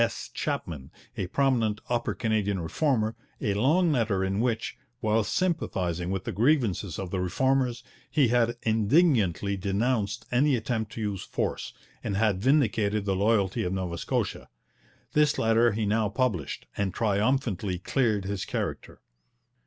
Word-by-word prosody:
S. - - -3
Chapman, 70 -5 -3 0.3
a 90 - -2
prominent 115 -3 +1
Upper 120 -1 -1
Canadian 105 -4 0
Reformer, 110 - 0 0.2
a 105 - 0
long 155 - +3
letter 110 -8 +1
in 95 +1 -1
which, 115 -1 -1 0.2
while 110 -2 +2
sympathizing 95 - -1
with 95 -1 -2
the - - -3
grievances 110 - +1
of 95 -2 -5
the 95 - -1
Reformers, 125 +6 +1 0.3
he 145 -6 +3
had 120 0 +2
indignantly 110 - +2
denounced 105 +3 -1
any 135 +3 +3
attempt 110 -2 -2
to 115 - -5
use 100 -3 -2
force, - - -3 0.3
and 100 - -2
had 105 -3 +2
vindicated 110 -6 +2
the 95 -1 +1
loyalty 100 -1 +2
of 90 - -2
Nova 90 -3 -3
Scotia. - - -2 0.6
This 150 -1 +3
letter 115 +1 +3
he 110 +1 -1
now 105 0 +1
published, 105 - -1
and 100 -2 -2
triumphantly 105 -3 0
cleared 105 0 0
his 100 -1 -3
character. - - -4
110 Hz, 145 wpm, -27 LUFS, 95-125 Hz, 0.6 s, long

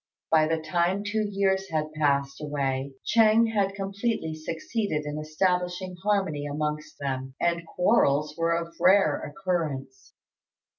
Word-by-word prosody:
By 155 -1 +5
the 160 +1 +1
time 175 +5 0
two 210 +1 -1
years 195 -1 +1
had 155 -1 -2
passed 140 -2 0
away 140 -2 -2
Ch'êng 225 0 +4
had 195 -2 +1
completely 195 -3 -2
succeeded 160 +1 -3
in 150 +1 -4
establishing 180 +3 -1
harmony 190 -8 0
amongst 150 +1 -3
them, 130 -1 -4
and 170 -1 0
quarrels 150 -6 +2
were 165 0 +1
of 170 0 -4
rare 180 -3 +4
occurrence. 150 -6 -4
165 Hz, 130 wpm, -27 LUFS, 150-195 Hz, -, By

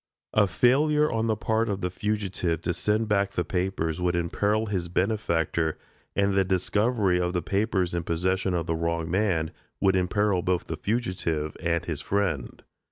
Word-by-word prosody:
A 105 -2 +4
failure 150 - +3
on 115 0 0
the 110 - +2
part 110 +1 0
of 100 -1 -2
the 90 - -1
fugitive 95 -5 -2
to 90 - 0
send 105 +5 0
back 100 -1 +1
the 90 - 0
papers 90 -3 -1
would 90 0 +1
imperil 100 +6 +1
his 95 -5 -2
benefactor, 85 -4 0 0.4
and 100 0 +2
the 95 0 +4
discovery 95 +1 +1
of 90 0 -1
the 90 -3 -1
papers 95 -2 0
in 85 - 0
possession 90 +3 0
of 85 -2 -1
the 80 - -1
wrong 85 0 -1
man 90 -5 +1 0.3
would 95 -1 +3
imperil 95 +1 +1
both 90 -1 0
the - - -4
fugitive 90 -9 -2
and 85 -1 0
his 80 -4 -3
friend. 95 -11 -2
95 Hz, 170 wpm, -26 LUFS, 85-105 Hz, 0.4 s, A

